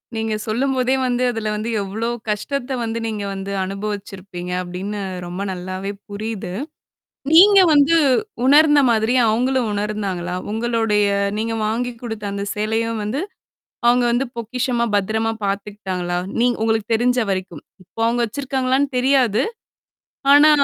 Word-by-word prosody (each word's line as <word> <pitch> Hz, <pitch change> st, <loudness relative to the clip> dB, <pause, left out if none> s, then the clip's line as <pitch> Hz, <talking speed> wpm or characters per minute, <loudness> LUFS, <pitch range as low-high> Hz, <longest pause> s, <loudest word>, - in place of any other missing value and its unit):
நீங்க 220 Hz, -1 st, -1 dB
சொல்லும்போதே 255 Hz, +3 st, +1 dB
வந்து 245 Hz, 0 st, 0 dB
அதுல 220 Hz, -2 st, -3 dB
வந்து 215 Hz, +2 st, -3 dB
எவ்ளோ 220 Hz, +4 st, -3 dB, 0.2 s
கஷ்டத்த 260 Hz, +5 st, -2 dB
வந்து 230 Hz, 0 st, -2 dB
நீங்க 210 Hz, -2 st, -3 dB
வந்து 195 Hz, +1 st, -5 dB
அனுபவிச்சிருப்பீங்க, 195 Hz, -2 st, -6 dB
அப்டின்னு 190 Hz, +4 st, -5 dB, 0.3 s
ரொம்ப 175 Hz, +2 st, -5 dB
நல்லாவே 185 Hz, +2 st, -4 dB, 0.2 s
புரியுது. 205 Hz, -3 st, -5 dB, 0.8 s
நீங்க 395 Hz, +4 st, +8 dB
வந்து 295 Hz, +3 st, +5 dB, 0.5 s
உணர்ந்த 295 Hz, +2 st, +6 dB
மாதிரி 225 Hz, +2 st, +2 dB
அவுங்களும் 250 Hz, +1 st, +1 dB
உணர்ந்தாங்களா? 200 Hz, -4 st, -3 dB, 0.2 s
உங்களுடைய 225 Hz, -2 st, +1 dB, 0.3 s
நீங்க 225 Hz, +1 st, -1 dB
வாங்கி 240 Hz, +3 st, -1 dB
குடுத்த 220 Hz, -3 st, -5 dB
அந்த 200 Hz, 0 st, -3 dB
சேலையும் 225 Hz, +1 st, -1 dB
வந்து 250 Hz, +8 st, -2 dB, 0.7 s
அவுங்க 245 Hz, 0 st, +4 dB
வந்து 250 Hz, +3 st, +1 dB
பொக்கிஷமா, 240 Hz, +1 st, -1 dB
பத்திரமா 220 Hz, +3 st, +1 dB
பாத்துக்கிட்டாங்களா? 195 Hz, -3 st, -3 dB, 0.2 s
நீங்க 245 Hz, 0 st, +2 dB
உங்களுக்கு 220 Hz, 0 st, 0 dB
தெரிஞ்ச 245 Hz, +2 st, +2 dB
வரைக்கும்? 185 Hz, -5 st, -4 dB, 0.2 s
இப்போ 190 Hz, +5 st, -11 dB
அவுங்க 240 Hz, +1 st, +1 dB
வச்சிருக்காங்களான்னு 265 Hz, +2 st, 0 dB
தெரியாது! 255 Hz, -5 st, +3 dB, 0.9 s
ஆனா, 295 Hz, +2 st, +8 dB
220 Hz, 120 wpm, -20 LUFS, 200-250 Hz, 0.9 s, நீங்க